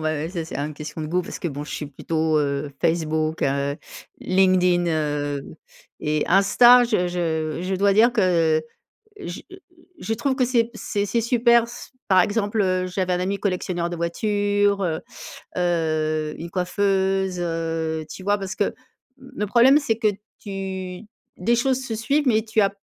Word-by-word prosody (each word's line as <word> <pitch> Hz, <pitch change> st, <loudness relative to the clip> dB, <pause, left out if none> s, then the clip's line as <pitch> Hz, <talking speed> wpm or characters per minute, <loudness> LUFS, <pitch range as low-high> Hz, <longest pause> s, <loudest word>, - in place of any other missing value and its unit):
ben, 155 Hz, 0 st, -1 dB
heu, -, -, -9 dB
ça 170 Hz, -3 st, -4 dB
c'est -, -, -6 dB
un 145 Hz, +2 st, -3 dB
question 150 Hz, +1 st, -7 dB
de -, -, -3 dB
goût 180 Hz, +2 st, +1 dB
parce -, -, -7 dB
que 170 Hz, -, -3 dB
bon 145 Hz, 0 st, -6 dB
je -, -, -10 dB
suis 150 Hz, -, -4 dB
plutôt, 155 Hz, +2 st, -1 dB
heu, 140 Hz, 0 st, -2 dB
Facebook, 160 Hz, -1 st, 0 dB
heu, 140 Hz, +1 st, 0 dB, 0.4 s
LinkedIn, 180 Hz, -2 st, +3 dB
heu 145 Hz, -3 st, -1 dB, 0.6 s
et 150 Hz, 0 st, 0 dB
Insta 240 Hz, +6 st, +6 dB
je 180 Hz, -6 st, 0 dB
je 160 Hz, -3 st, -2 dB
je 190 Hz, +1 st, -2 dB
dois 200 Hz, +1 st, +3 dB
dire 230 Hz, +4 st, +5 dB
que 165 Hz, -7 st, +2 dB, 0.6 s
j 175 Hz, -, -7 dB, 0.6 s
je 225 Hz, -, -2 dB
trouve 270 Hz, +3 st, -1 dB
que 255 Hz, -, +1 dB
c'est 235 Hz, -2 st, +1 dB
c'est 205 Hz, 0 st, -2 dB
c'est 230 Hz, +3 st, 0 dB
super 235 Hz, 0 st, +4 dB
s 240 Hz, +1 st, -11 dB, 0.2 s
par 185 Hz, -, +6 dB
exemple, 205 Hz, +1 st, 0 dB
heu, 185 Hz, -1 st, 0 dB
j'avais 185 Hz, 0 st, -1 dB
un 180 Hz, -, -1 dB
ami 195 Hz, +2 st, -1 dB
collectionneur 180 Hz, -3 st, -2 dB
de 175 Hz, -, -4 dB
voitures, 205 Hz, +3 st, 0 dB
heu, 160 Hz, -3 st, -1 dB, 0.6 s
heu, 155 Hz, -3 st, 0 dB
une 170 Hz, +1 st, -7 dB
coiffeuse, 190 Hz, 0 st, 0 dB
heu, 165 Hz, -2 st, -2 dB
tu 185 Hz, -, -9 dB
vois? 205 Hz, +1 st, +2 dB
Parce 195 Hz, +1 st, -5 dB
que 205 Hz, -, 0 dB, 0.4 s
le 260 Hz, -5 st, -5 dB
problème 250 Hz, +6 st, +6 dB
c'est 225 Hz, -7 st, -1 dB
que 225 Hz, -1 st, +1 dB, 0.3 s
tu 190 Hz, -2 st, -6 dB, 0.4 s
des 235 Hz, +7 st, +2 dB
choses 260 Hz, +2 st, +1 dB
se 225 Hz, -4 st, -3 dB
suivent 275 Hz, +6 st, 0 dB
mais 220 Hz, -2 st, +3 dB
tu 220 Hz, -1 st, +1 dB
as 195 Hz, -, +3 dB
p -, -, -26 dB
185 Hz, 175 wpm, -23 LUFS, 160-210 Hz, 0.6 s, Insta